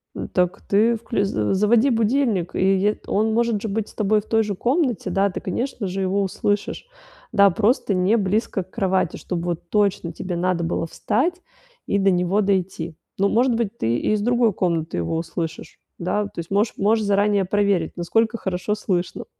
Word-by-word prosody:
М. - - -5
Так 180 +2 0
ты 225 +4 +2
вклю 220 -2 -2
заво 110 - 0
заводи 220 +6 +3
будильник, 225 -5 +1
и - - -1 0.2
е 205 +3 +1
он 220 +2 +1
может 230 -3 +1
же - - -3
быть 210 +1 -2
с - - -16
тобой 210 0 +1
в - - -22
той 225 0 +2
же 205 -2 -3
комнате. 250 - 0
Да, 200 +1 +2
ты, 180 - -5
конечно 230 +1 -3
же, 190 +2 -3
его 195 +1 +1
услышишь. 205 - -2 0.4
Да, 200 -1 +6
просто 220 +3 +1
не 185 +5 +2
близко 200 -1 0
к 185 - -29
кровати, 190 -3 0
чтоб 180 - -4
вот 170 0 -4
точно 200 -4 +1
тебе 175 +2 -5
надо 175 0 0
было 165 0 -1
встать 340 - -1 0.4
и 200 - 0
до 195 0 +3
него 180 +3 +1
дойти. 185 -5 -1 0.2
Ну, 200 +1 +2
может 245 +3 +3
быть, 230 -1 -2
ты 115 +1 0
и - - 0
из 210 - 0
другой 235 -1 +2
комнаты 165 - -1
его 85 - -1
услышишь. 165 0 -5 0.2
Да, 205 +4 0
вот 205 - -8
то - - -7
есть, 165 - -6
можешь 205 +3 +1
можешь 215 +2 +2
заранее 200 -1 +2
проверить, 200 -4 +1
насколько 225 +7 +1
хорошо 185 +1 -2
слышно. 185 -4 -2
200 Hz, 195 wpm, -22 LUFS, 180-220 Hz, 0.4 s, Да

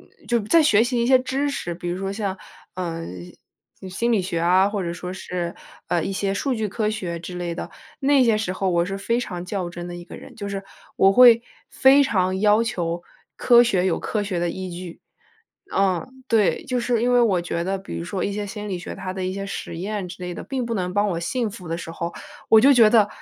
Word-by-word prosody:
嗯， - - -23
就 235 -1 +1
在 270 +11 +4
学 220 -7 +5
习 240 0 0
一 235 - +1
些 260 0 +6
知 270 +3 -1
识， 175 -11 -4
比 175 0 -5
如 175 - -2
说 195 0 -3
像， 200 -2 -3 0.4
呃， 170 -2 -4 0.8
嗯， 190 - -7
心 235 +6 -1
理 200 -4 +2
学 175 -2 -2
啊， 185 +3 +4
或 205 -2 -2
者 170 -1 -3
说 180 +1 -6
是， 175 -2 -4 0.3
呃， 170 - +1
一 195 - -3
些 195 0 -1
数 255 +6 -1
据 220 -2 -2
科 210 +1 -1
学 185 -6 -3
之 180 +2 -8
类 175 -1 -3
的， - - -6 0.3
那 275 -1 +4
些 225 -2 +3
时 215 -4 -2
候 190 0 -1
我 170 -1 +2
是 195 +2 -4
非 230 +4 0
常 180 -7 -5
较 180 -1 -3
真 175 0 -7
的 175 - -6
一 175 - -9
个 - - -11
人。 - - -12
就 200 - -5
是 195 0 -4 0.3
我 195 0 +5
会 240 0 +8 0.3
非 270 +2 +5
常 190 -7 0
要 210 +2 +4
求 175 -6 -2 0.3
科 240 -1 +6
学 190 -6 +1
有 185 - +1
科 210 -2 -2
学 195 -3 -2
的 175 0 0
依 185 +1 -6
据。 175 0 -8 0.7
嗯， 195 +7 -1
对， 220 -4 +2
就 250 -1 -1
是 235 -1 0
因 245 +1 +2
为 245 - +5
我 200 -7 +3
觉 170 0 -3
得， 195 +2 -1
比 85 - -7
如 85 - -5
说 185 - -3
一 200 - -2
些 205 0 -3
心 210 0 -6
理 185 -2 -3
学 175 - -7
它 185 -1 -5
的 190 -1 -4
一 185 - -2
些 195 - -4
实 195 - -6
验 200 0 -3
之 180 +1 -10
类 180 - -4
的， - - -7
并 265 -2 -3
不 230 - -3
能 180 -2 -2
帮 205 +1 +2
我 170 -3 -2
信 225 +6 -1
服 180 -4 -10
的 165 - -2
时 165 - -7
候， 170 +1 -4 0.4
我 220 - +8
就 275 +3 +7
觉 230 -4 +7
得 220 -3 +5
195 Hz, 265 characters per minute, -23 LUFS, 180-230 Hz, 0.8 s, 会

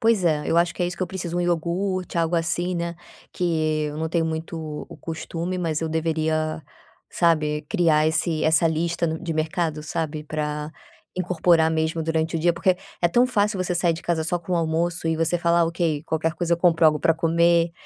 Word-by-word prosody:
Pois 225 -5 +3
é, 155 -3 +2
eu 165 - +1
acho 170 0 +2
que - - -2
é 175 - +2
isso 180 - -5
que - - -3
eu 185 - 0
preciso, 175 -2 -5
1 - - +1
iogurte, 175 +2 -1
algo 165 +1 +1
assim, 175 +2 -1
né, 170 0 -3 0.4
que 155 -3 0
eu 150 - -5
não 160 +1 -2
tenho 165 0 +1
muito 160 +1 -4
o 155 -2 -6
o - - -9
costume, 165 +2 -4
mas 165 -3 -1
eu 160 - -2
deveria, 160 -1 -1 0.5
sabe, 155 -3 +1
criar 160 -5 +3
esse 160 0 0
essa 160 +1 +4
lista 170 +1 0
no 160 0 -2
de 170 -2 -2
mercado, 160 0 -1
sabe, 155 -1 -3
para 150 0 -3 0.5
incorporar 170 -2 +3
mesmo 160 0 0
durante 160 0 -1
o - - -1
dia, 170 +2 +3
porque 180 +2 +1 0.3
é 175 - +5
tão 240 +8 +4
fácil 210 -5 +1
você 180 -1 -2
sair 175 -1 +2
de 165 - -9
casa 170 -2 0
só 175 +2 0
com 175 +2 -6
o 175 - +3
almoço 165 +1 -1
e 160 - +1
você 165 +2 +1
falar: 170 0 +3
“Ok, 165 -3 -1
qualquer 160 +1 -1
coisa, 175 -1 -1
eu - - -8
compro 170 -2 +3
algo 150 -1 +3
para 165 - +3
comer”, 170 +1 +3
165 Hz, 215 wpm, -24 LUFS, 160-175 Hz, 0.5 s, é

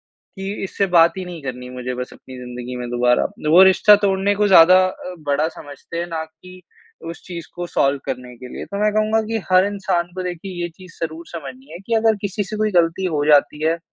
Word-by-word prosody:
की 195 +1 -8
इससे 195 +1 -1
बात 165 0 +6
ही 185 - -4
नहीं 175 -4 -9
करनी 125 -1 -6
मुझे 125 0 -5
बस 125 0 -6
अपनी 130 -1 -13
ज़िन्दगी 125 0 -7
में 125 -1 -5
दोबारा, 125 0 +2 0.3
वो 180 +3 +8
रिश्ता 205 +2 +6
तोड़ने 195 +1 +2
को 210 0 +2
ज़्यादा 185 0 +8
अ, 180 0 -7
बड़ा 145 +1 0
समझते 145 +2 -9
हैं 170 - -2
ना 160 -1 -3
कि 180 +3 -16 0.5
उस 170 - -10
चीज़ 170 -3 -7
को 175 0 -5
सॉल्व 140 -4 +1
करने 125 -1 -5
के 125 +1 -10
लिए। - - -6
तो 200 - -6
मैं 210 0 +2
कहूँगा 215 +1 +2
कि 225 0 -1
हर 185 +1 +5
इंसान 190 -4 -1
को 185 - -4
देखिए 175 0 -5
ये 175 - -2
चीज़ 185 -2 -15
ज़रूर 165 +1 -7
समझनी 135 -2 -9
है 170 - -8
कि 230 - 0
अगर 220 -1 +3
किसी 205 0 -2
से 215 +3 -6
कोई 215 0 0
गलती 170 +1 +2
हो 145 0 0
जाती 150 +1 +3
है, 165 +1 +1
170 Hz, 225 wpm, -20 LUFS, 140-190 Hz, 0.5 s, वो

